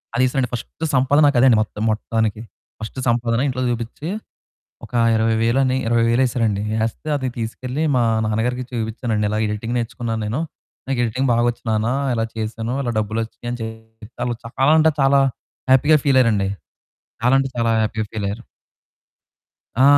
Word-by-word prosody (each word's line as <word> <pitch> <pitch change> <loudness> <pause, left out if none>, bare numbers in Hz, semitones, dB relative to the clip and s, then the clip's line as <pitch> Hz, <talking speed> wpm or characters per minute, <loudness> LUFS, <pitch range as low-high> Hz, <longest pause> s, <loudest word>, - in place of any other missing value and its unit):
అది 125 - +3
ఏసారండి 125 -2 -1
ఫస్ట్ 120 +6 -6
సంపాదనక 145 +2 +4
అదే 130 - +6
అండి 115 - +5
మొత్తం 105 0 -7
మొత్తానికి. 110 -1 -1 0.4
ఫస్ట్ 110 +3 -7
సంపాదన 120 0 +1
ఇంట్లో 130 -1 -2
చూపించి, 120 +5 -4 0.8
ఒక - - -18 0.2
20,000 115 +3 +2
అని, 130 0 +1
20,000 115 +2 +3
వేసారండి. 115 -5 0 0.2
ఏస్తే 115 +7 -4
అది 130 -1 -3
తీసుకెళ్ళి 125 +5 -3
మా 120 - +3 0.2
నాన్నగారికి 125 +4 -1
చూపించానండి. 110 -2 -1
ఇలా 105 +1 -1
ఎడిటింగ్ 105 +3 -3
నేర్చుకున్నాను 115 -1 -3
నేను. 115 +9 -2 0.5
నాకు 135 -2 -1
ఎడిటింగ్ 130 +4 0
బాగొచ్చు 120 0 +1
నాన్న, 110 0 +1 0.3
ఇలా 115 -1 0
చేసాను, 110 +2 -3
ఇలా 120 - -1
డబ్బులు 110 +1 -2
వచ్చినాయి 120 +1 -9
అని 120 - -5
చెప్పి, 110 0 -10 0.2
వాళ్ళు 120 -1 -1
చాలా 135 +5 +2
అంటే 160 0 +5
చాలా 135 +1 +5 0.5
హ్యాపీగా 145 +4 +6
ఫీల్ 135 -2 +5
అయ్యారండి. 105 -5 +2 0.7
చాలా 125 +2 +4
అంటే 135 0 -1
చాలా 115 -1 +2
హ్యాపీగా 110 0 -1
ఫీల్ 110 -2 -3
అయ్యారు. 115 +4 -6 1.4
ఆ! - - +6
115 Hz, 155 wpm, -21 LUFS, 110-130 Hz, 1.4 s, అదే